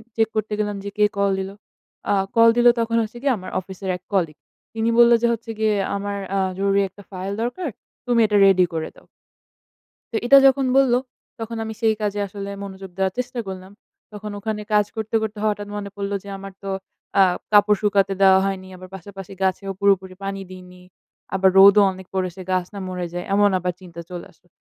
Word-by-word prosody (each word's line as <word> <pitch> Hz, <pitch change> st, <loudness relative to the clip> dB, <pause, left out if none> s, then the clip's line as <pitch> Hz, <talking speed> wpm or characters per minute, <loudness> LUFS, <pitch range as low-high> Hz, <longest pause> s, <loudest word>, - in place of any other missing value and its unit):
Check 225 Hz, -1 st, +2 dB
করতে 215 Hz, 0 st, -1 dB
গেলাম 210 Hz, -1 st, -1 dB
যে, 200 Hz, -, -4 dB
কে 210 Hz, -, +5 dB
কল 200 Hz, 0 st, +2 dB
দিল? 190 Hz, 0 st, -4 dB, 0.6 s
অ্যা 205 Hz, -, +3 dB, 0.2 s
কল 230 Hz, 0 st, +7 dB
দিল 240 Hz, 0 st, +5 dB
তখন 230 Hz, 0 st, 0 dB
হচ্ছে 220 Hz, +2 st, -8 dB
গিয়ে 275 Hz, -2 st, +2 dB
আমার 185 Hz, 0 st, -9 dB
অফিসের 190 Hz, +1 st, -8 dB
এক 180 Hz, -, -32 dB
কলিগ। 165 Hz, -6 st, 0 dB, 0.4 s
তিনি 225 Hz, 0 st, 0 dB
বললো 235 Hz, 0 st, +7 dB
যে 235 Hz, -, +3 dB
হচ্ছে 230 Hz, 0 st, -6 dB
গিয়ে 215 Hz, -1 st, +2 dB, 0.2 s
আমার 200 Hz, 0 st, -3 dB, 0.2 s
আ -, -, +2 dB, 0.2 s
জরুরি 200 Hz, 0 st, +2 dB
একটা 205 Hz, -, -16 dB
ফাইল 190 Hz, +1 st, -4 dB
দরকার। 285 Hz, +7 st, -3 dB, 0.4 s
তুমি 240 Hz, -1 st, +2 dB
এটা 210 Hz, -1 st, +2 dB
রেডি 185 Hz, -2 st, +5 dB
করে 160 Hz, -1 st, -3 dB
দাও। -, -, -19 dB, 1.1 s
তো -, -, -4 dB
এটা 275 Hz, +3 st, +8 dB
যখন 270 Hz, 0 st, +3 dB
বলল 265 Hz, -3 st, +4 dB, 0.5 s
তখন 225 Hz, 0 st, -5 dB
আমি 220 Hz, 0 st, -5 dB
সেই 220 Hz, -1 st, +3 dB
কাজে 205 Hz, -1 st, -1 dB
আসলে 200 Hz, +1 st, -7 dB
মনোযোগ 190 Hz, -1 st, -8 dB
দেওয়ার 190 Hz, -1 st, 0 dB
চেষ্টা 250 Hz, 0 st, -3 dB
করলাম। 190 Hz, 0 st, -8 dB, 0.4 s
তখন 210 Hz, 0 st, -7 dB
ওখানে 215 Hz, 0 st, -3 dB
কাজ 210 Hz, -1 st, +4 dB
করতে, 220 Hz, 0 st, -3 dB
করতে 215 Hz, -1 st, -4 dB
হঠাৎ 205 Hz, -1 st, -1 dB
মনে 205 Hz, -1 st, -5 dB
পড়ল 200 Hz, 0 st, -4 dB
যে 200 Hz, -, -10 dB
আমার 195 Hz, 0 st, -9 dB
তো 195 Hz, -, -4 dB, 0.5 s
আ -, -, +8 dB, 0.3 s
কাপড় 205 Hz, 0 st, +5 dB
শুকাতে 195 Hz, -2 st, +2 dB
দেওয়া 190 Hz, -1 st, +7 dB
হয়নি। 190 Hz, -1 st, -3 dB
আবার 185 Hz, 0 st, -12 dB
পাশাপাশি 195 Hz, 0 st, -10 dB
গাছেও 195 Hz, +1 st, -1 dB
পুরোপুরি 190 Hz, -2 st, +2 dB
পানি 195 Hz, 0 st, -4 dB
দিইনি। 180 Hz, -1 st, -12 dB, 0.5 s
আবার 190 Hz, 0 st, +4 dB
রোদও 200 Hz, +1 st, +8 dB
অনেক 190 Hz, -1 st, -12 dB
পড়েছে 185 Hz, 0 st, -2 dB
গাছ 185 Hz, -1 st, +1 dB
না 200 Hz, -, -6 dB
মরে 180 Hz, -1 st, -4 dB
যায়! 175 Hz, 0 st, -4 dB
এমন 205 Hz, 0 st, +4 dB
আবার 180 Hz, 0 st, -2 dB
চিন্তা 170 Hz, -2 st, -10 dB
চলে 175 Hz, -1 st, -7 dB
আসলো। 175 Hz, -, -31 dB
200 Hz, 200 wpm, -22 LUFS, 190-215 Hz, 1.1 s, এটা